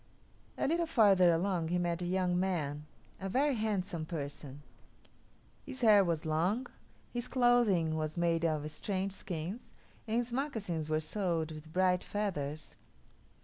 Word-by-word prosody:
A - - 0
little 335 +3 +1
farther 195 - +5
along 170 0 0
he 175 +2 0
met 175 0 -1
a 175 - -2
young 180 -1 +1
man, 150 -6 -2 0.3
a 195 - -4
very 280 +7 +2
handsome 200 -7 -2
person. 145 -3 -6 1.0
His 265 -2 -8
hair 210 -4 +7
was 165 -3 -1
long; 175 +11 +1 0.5
his 240 0 -2
clothing 240 -11 +3
was 155 +1 -3
made 170 -1 +1
of 155 -2 0
strange 195 +4 -2
skins, 185 +3 -6 0.4
and 220 +1 0
his 240 0 -1
moccasins 210 - -2
were 155 0 +1
sewed 165 -2 -1
with 155 0 -10
bright 180 +1 +2
feathers. 155 -8 -4
180 Hz, 145 wpm, -32 LUFS, 160-210 Hz, 1.0 s, hair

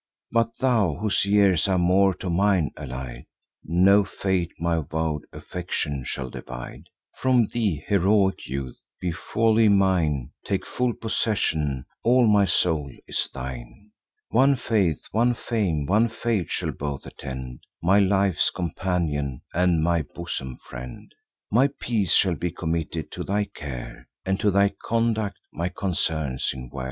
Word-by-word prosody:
But 115 0 +1
thou, 110 - +2
whose 105 +4 0
years 100 -4 +4
are 95 -1 +2
more 95 +2 +4
to - - -6
mine 95 -3 +2
allied, 65 -3 -7 0.4
No 95 +5 +5
fate 95 -3 -1
my 85 0 +1
vow'd 80 0 -2
affection 75 -6 -4
shall 65 -1 -4
divide 60 -1 -8 0.3
From 130 -3 +4
thee, 100 -11 0
heroic 100 0 +2
youth! 65 -1 -5 0.2
Be 90 - -1
wholly 110 +5 +2
mine; 85 -10 +2
Take 100 -2 -2
full 125 -1 0
possession; 80 - -1 0.2
all 125 +1 +4
my 105 -2 +5
soul 80 -7 +1
is - - -2
thine. 65 - -8 0.4
One 135 +4 +4
faith, 100 - +1
one 120 +2 +2
fame, 95 - -1
one 110 +8 +3
fate, 115 -4 -1
shall - - -2
both 70 -1 -5
attend; 65 -2 -7 0.2
My 95 +4 +5
life's 95 -3 +3
companion, 80 -6 -2
and 85 -2 +2
my 85 0 +2
bosom 70 -5 -6
friend: 65 0 -9 0.4
My 130 +6 +4
peace 105 -8 +1
shall 95 -3 +4
be 85 +2 -2
committed 80 -2 -3
to - - -5
thy 105 +1 0
care, - - -7 0.2
And 95 +1 0
to 105 - +3
thy 100 +1 +3
conduct 115 -3 0 0.2
my 85 +3 -2
concerns 80 -8 -1
in 65 -1 -8
war." 70 - -6
90 Hz, 140 wpm, -25 LUFS, 75-105 Hz, 0.4 s, No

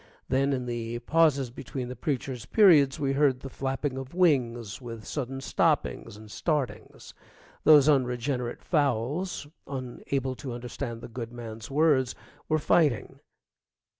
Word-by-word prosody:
Then 135 +2 +2
in 130 -2 -1
the 120 -1 -3
pauses 140 -1 +2
between 125 +1 -6
the 125 - -6
preacher's 130 -2 -3
periods 155 -11 +5
we 135 -1 0
heard 135 -3 +2
the 135 - -8
flapping 135 0 -2
of 135 +5 -9
wings, 120 - +1
with 115 -3 -8
sudden 135 -2 -4
stoppings 105 - 0
and 110 0 -13
startings. 150 -3 -3 0.5
Those 150 -2 +8
unregenerate 125 -2 0
fowls, 145 +4 0 0.2
unable 130 0 -3
to 130 -3 -6
understand 120 0 -6
the - - -7
good 115 -1 -6
man's 115 -1 -8
words, 140 -3 +2 0.3
were 155 - +3
fighting. 145 - +1
130 Hz, 135 wpm, -28 LUFS, 120-145 Hz, 0.5 s, Those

